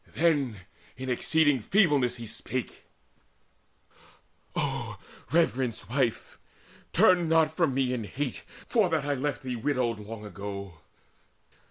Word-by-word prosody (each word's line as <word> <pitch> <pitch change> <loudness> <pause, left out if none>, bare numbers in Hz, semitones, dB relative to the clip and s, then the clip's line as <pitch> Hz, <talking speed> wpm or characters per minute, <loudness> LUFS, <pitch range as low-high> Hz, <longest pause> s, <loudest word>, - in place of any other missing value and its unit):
Then 140 - +2 0.4
in 130 0 -3
exceeding 145 +2 +3
feebleness 145 - +3
he 115 - -7
spake: 115 +3 -5 1.7
"O - - -2 0.3
reverenced 130 -8 +1
wife, 125 -4 -1 0.5
turn 175 -3 +5
not 160 -1 +3
from 160 -7 +2
me 130 -2 +1
in 115 -4 -3
hate 135 +3 -4 0.2
For 215 -6 +2
that 160 -4 0
I 145 - +1
left 145 +1 -2
thee 130 -1 -3
widowed 120 -2 0
long 105 +1 -8
ago! 100 -4 -7
130 Hz, 120 wpm, -28 LUFS, 115-155 Hz, 1.7 s, turn